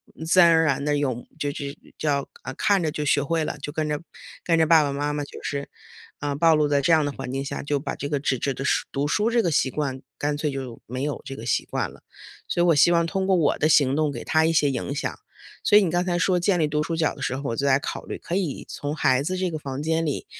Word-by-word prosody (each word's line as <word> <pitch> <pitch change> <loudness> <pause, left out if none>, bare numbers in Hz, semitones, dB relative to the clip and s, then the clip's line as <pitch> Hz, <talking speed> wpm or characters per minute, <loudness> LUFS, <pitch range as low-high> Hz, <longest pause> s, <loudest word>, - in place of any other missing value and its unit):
嗯， 160 - -7
自 165 +3 +4
然 170 - +7
而 160 0 +5
然 140 -2 +1
地 145 0 +1
用 130 -4 -2
这 145 -1 -1
这 140 0 -6 0.2
叫 140 -3 0 0.2
呃， 130 - -5
看 200 -3 +2
着 155 - 0
就 150 0 -3
学 145 - +3
会 160 +2 0
了， - - -4
就 145 - -5
跟 155 0 -2
着 150 -1 -2 0.4
跟 165 -1 +2
着 160 - +4
爸 160 -1 +6
爸 140 - -1
妈 145 +1 -2
妈 145 0 -2
就 145 - -10
是， 140 -1 -4 0.5
啊， 145 -1 -2
暴 165 +3 +4
露 150 -1 +2
在 145 -1 +2
这 155 - +2
样 160 -2 +4
的 145 - -1
环 125 - -6
境 135 +1 -2
下， - - -4
就 145 0 0
把 135 0 -4
这 145 - -5
个 145 -1 0
纸 135 -1 0
质 135 +3 -1
的 135 - -5
书 - - +1
读 140 +1 -1
书 210 +9 +1
这 235 0 +3
个 175 - 0
习 140 -4 +1
惯 135 -3 -3 0.2
干 145 0 -1
脆 150 0 -1
就 130 -4 -6
没 125 +2 -4
有 145 0 -3
这 135 - -7
个 115 - -8
习 120 - +1
惯 - - -2
了。 - - -17 0.5
所 175 - +1
以 - - +4
我 165 - +5
希 160 +4 +5
望 170 -1 +3
通 190 +2 -1
过 190 0 +3
我 155 -4 +2
的 155 - +2
行 140 -3 +4
动 155 -1 +1
给 120 - -7
他 160 0 +3
一 165 - +3
些 150 -3 +3
影 135 +1 -3
响。 145 - -3 0.5
所 210 - +6
以 210 - +6
你 180 - 0
刚 175 +2 +1
才 175 -1 0
说 185 0 +2
建 180 +1 +2
立 155 - +2
读 150 0 0
书 165 +1 -3
角 160 -2 +1
的 - - -11
时 130 - -1
候， 140 - -6
我 - - -2
就 140 - -1
在 135 -1 +4
考 145 - -5
虑 - - -5
可 170 - -5
以 180 -8 -2
从 145 +1 -4
孩 130 -3 +2
子 185 +5 -2
这 185 0 0
个 155 - -3
房 135 -2 -5
间 160 +1 0
里 145 - -2
150 Hz, 320 characters per minute, -24 LUFS, 140-165 Hz, 0.5 s, 然